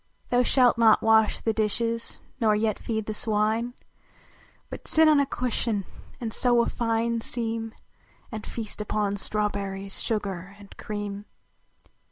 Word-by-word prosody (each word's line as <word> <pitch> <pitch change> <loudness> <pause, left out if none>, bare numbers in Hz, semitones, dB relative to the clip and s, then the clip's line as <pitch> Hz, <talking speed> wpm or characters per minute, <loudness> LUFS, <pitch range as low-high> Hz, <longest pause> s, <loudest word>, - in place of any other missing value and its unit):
Thou 245 0 +4
slialt 250 -1 +4
not 225 -2 +5
wash 220 -1 +4
the 225 - 0
dishes, 230 +2 -1 0.2
nor 220 -3 +3
yet 215 0 0
feed 220 -2 -3
the 215 - -3
swine, 220 +3 0 0.9
But - - -9
sit 320 0 +5
on 305 -2 +6
a 280 - +2
cushion 230 -6 -1 0.3
and 225 -3 -4
sew 240 -2 +3
a - - -1
fine 230 0 0
seam, 225 -1 -3 0.6
And 215 -2 -5
feast 215 -2 -5
upon 210 -1 -1
strawberries, 200 -2 -2
sugar 195 -4 -3
and 200 -1 -14
cream. 205 -1 -5
220 Hz, 140 wpm, -26 LUFS, 210-235 Hz, 0.9 s, on